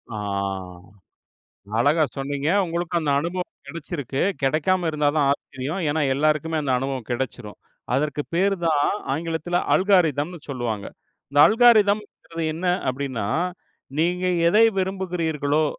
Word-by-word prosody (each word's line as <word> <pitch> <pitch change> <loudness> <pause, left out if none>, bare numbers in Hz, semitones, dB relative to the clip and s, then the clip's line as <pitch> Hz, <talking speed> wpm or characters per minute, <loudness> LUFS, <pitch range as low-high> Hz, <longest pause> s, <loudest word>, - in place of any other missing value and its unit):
ஆ. - - -4 1.6
அழகா 150 +6 +3
சொன்னீங்க. 140 +1 -3 0.2
உங்களுக்கு 170 0 -2
அந்த 150 -3 0
அனுபவம் 175 +4 -3 0.2
கிடைச்சிருக்கு 145 -4 -4 0.2
கிடைக்காம 165 +5 +1
இருந்தா 150 -2 +1
தான் 145 -2 +3
ஆச்சரியம். 140 +5 -4
ஏன்னா 155 +2 0
எல்லாருக்குமே 155 +3 +1
அந்த 140 -3 -1
அனுபவம் 135 -3 -4
கிடைச்சிடும். 120 -3 -4 0.4
அதற்கு 145 +1 0
பேர் 195 +3 +2
தான் 155 -3 +3 0.3
ஆங்கிலத்தில் 165 +3 -2 0.2
அல்காரிதம்னு 175 -4 +2
சொல்லுவாங்க. 120 -6 -3 0.4
இந்த 145 +1 +1
அல்காரிதம்ங்கிறது 210 -7 +3
என்ன 170 +4 -5 0.2
அப்படின்னா, 130 -4 -3 0.7
நீங்க 180 +2 +1 0.2
எதை 215 +6 +6
விரும்புகிறீர்களோ, 165 -6 0
155 Hz, 110 wpm, -23 LUFS, 140-175 Hz, 1.6 s, எதை